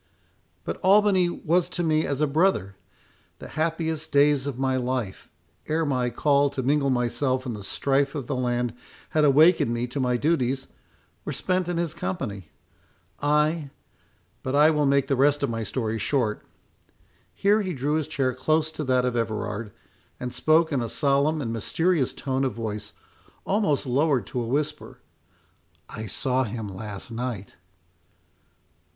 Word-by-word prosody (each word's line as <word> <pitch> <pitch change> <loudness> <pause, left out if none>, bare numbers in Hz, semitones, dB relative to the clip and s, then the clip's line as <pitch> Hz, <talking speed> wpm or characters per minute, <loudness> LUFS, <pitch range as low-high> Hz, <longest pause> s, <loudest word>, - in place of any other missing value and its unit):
But - - -4
Albany 195 -2 +4
was 175 +1 0
to 175 -1 -2
me 155 -1 +2
as 140 0 -2
a - - +5
brother. 150 - +1 0.6
The - - -10
happiest 160 0 -2
days 145 -1 +3
of 135 -4 -4
my 130 0 0
life, 125 -6 -3 0.4
ere 160 +1 0
my 125 -4 0
call 140 +2 +2
to 135 -1 -4
mingle 140 +1 +2
myself 130 +1 0
in 125 - -3
the 105 -2 -7
strife 140 +6 0
of 140 -4 -3
the 140 - -3
land 120 -2 -1 0.4
had 155 - +2
awakened 150 -1 +5
me 120 +1 -1
to 125 +3 -5
my 125 -2 +1
duties, 135 -2 0 0.6
were - - -4
spent 185 -1 -1
in 175 - -1
his 170 -2 -1
company. 105 - -4 0.7
I—but 150 -2 -3
I 150 +2 +6
will 150 -2 +2
make 140 -1 +3
the 135 - +1
rest 145 +2 +3
of 140 - 0
my 115 0 -3
story 110 -1 -2
short."—Here 140 - -3
he 185 -3 -3
drew 145 +1 -1
his 155 -2 0
chair 130 -2 0
close 155 +5 +1
to 155 -1 -5
that 130 -1 +2
of 125 -1 -1
Everard, 110 -1 -2 0.5
and 125 0 -5
spoke 155 +5 +3
in 135 -4 0
a 115 - -3
solemn 145 +3 +1
and 115 -2 -3
mysterious 160 - +1
tone 135 -1 -2
of 130 - -1
voice, 105 -2 -5 0.5
almost 190 -9 +1
lowered 135 -2 +1
to 125 - -3
a 115 - -3
whisper—"I 130 -4 -7
saw 130 +4 0
him 110 -3 -5
last 105 +2 -7
night." 115 -4 -5
135 Hz, 155 wpm, -25 LUFS, 120-155 Hz, 0.7 s, I